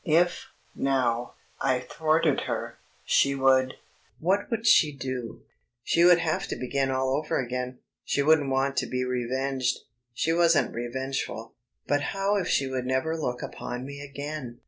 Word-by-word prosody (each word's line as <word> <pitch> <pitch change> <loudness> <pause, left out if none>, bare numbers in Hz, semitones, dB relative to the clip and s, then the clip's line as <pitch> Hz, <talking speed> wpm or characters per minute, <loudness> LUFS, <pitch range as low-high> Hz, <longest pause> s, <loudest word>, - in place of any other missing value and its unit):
If, 175 +2 +2 0.3
now, 125 -3 0 0.3
I 130 -1 +2
thwarted 155 +4 +1
her, - - -4 0.2
she 140 0 +3
would... 130 -1 +3 0.4
what 190 +5 +1
would 230 -1 -2
she 155 -8 +6
do? 130 -3 -5 0.4
She 170 - +3
would 175 0 +8
have 165 -2 -1
to - - -3
begin 135 +1 -1
all 130 0 0
over 150 +1 -1
again. 125 0 -3 0.3
She 140 - 0
wouldn't 150 -2 +4
want 135 +1 0
to - - +1
be 125 0 -1
revenged; 130 +1 -1 0.3
she 160 +7 0
wasn't 170 -2 +3
revengeful. 120 -1 -4 0.3
But 145 +1 +1
how 195 +6 0
if 185 -3 -1
she 140 - +2
would 130 -1 -3
never 130 +5 0
look 125 -6 -3
upon 125 +1 -5
me 140 +1 -8
again? 140 -3 -6
135 Hz, 155 wpm, -27 LUFS, 125-155 Hz, 0.4 s, would